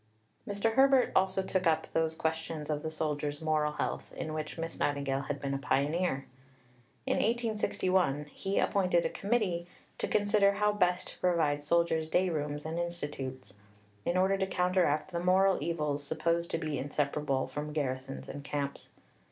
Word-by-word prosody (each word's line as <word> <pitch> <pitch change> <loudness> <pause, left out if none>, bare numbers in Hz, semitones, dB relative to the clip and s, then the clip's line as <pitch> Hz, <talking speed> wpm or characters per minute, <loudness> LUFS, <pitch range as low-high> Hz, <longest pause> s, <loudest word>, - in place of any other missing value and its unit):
Mr. 205 +2 0
Herbert 270 0 +5
also 190 0 +3
took 185 -1 0
up 160 -1 +2
those 160 0 +1
questions 160 -1 -2
of 150 -1 -1
the 160 - -3
soldier's 150 -2 -2
moral 155 -1 +1
health - - -3
in 155 - -3
which 155 +1 -4
Miss 165 0 -5
Nightingale 140 -2 0
had 145 -1 -2
been 140 -1 -2
a 135 - -1
pioneer. 145 +1 0 0.8
In - - +1
1861 190 - +1
he 195 +1 -2
appointed 180 -3 +2
a - - +2
Committee 195 -6 0 0.3
to - - -1
consider 205 -1 +3
how 210 +1 +2
best 180 -3 +1
to - - -12
provide 160 -5 +2
soldiers' 160 0 +2
day 185 +3 +3
rooms 150 -1 -3
and 160 +2 -2
institutes, 145 - -5 0.5
in 175 - 0
order 190 +1 +3
to 190 - +1
counteract 180 -3 +1
the 170 - -1
moral 185 +1 +3
evils 150 -3 -1
supposed 170 +4 0
to - - 0
be 155 -3 -2
inseparable 140 -1 0
from 150 +1 -5
garrisons 135 -2 -3
and 140 0 -7
camps. 140 -1 -4
160 Hz, 160 wpm, -31 LUFS, 145-185 Hz, 0.8 s, Herbert